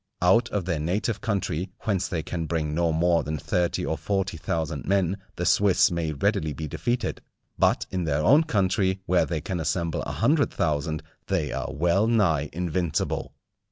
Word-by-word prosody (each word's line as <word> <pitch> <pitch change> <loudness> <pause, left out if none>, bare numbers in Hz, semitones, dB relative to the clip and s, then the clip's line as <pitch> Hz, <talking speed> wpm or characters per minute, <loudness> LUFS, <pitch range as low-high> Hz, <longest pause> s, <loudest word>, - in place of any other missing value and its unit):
Out 115 +7 +4
of 100 -4 -2
their 85 -4 -1
native 100 +6 -1
country, 95 -4 -1
whence 100 -4 0
they 85 -5 -3
can 85 0 -4
bring 75 -2 -1
no 85 +1 +1
more 85 +1 +3
than 75 +1 -3
thirty 85 +4 0
or 80 -2 -2
forty 95 +2 -1
thousand 80 -1 -3
men, 95 -1 +2 0.2
the 90 - -3
Swiss 100 -1 +4
may 85 -2 -1
readily 85 0 0
be 80 +2 -5
defeated; 120 - -2 0.4
but - - +3
in 90 -2 -1
their 75 -1 0
own 150 - +5
country, 95 - +1
where 90 -1 +2
they 80 -3 -2
can 90 +3 -3
assemble 85 +1 -1
a - - -4
hundred 145 +5 +2
thousand, 80 0 -1 0.2
they 90 -6 0
are 65 0 -3
well 90 +7 +2
nigh 85 -11 +2
invincible. 85 -1 -2
85 Hz, 175 wpm, -26 LUFS, 80-100 Hz, 0.4 s, own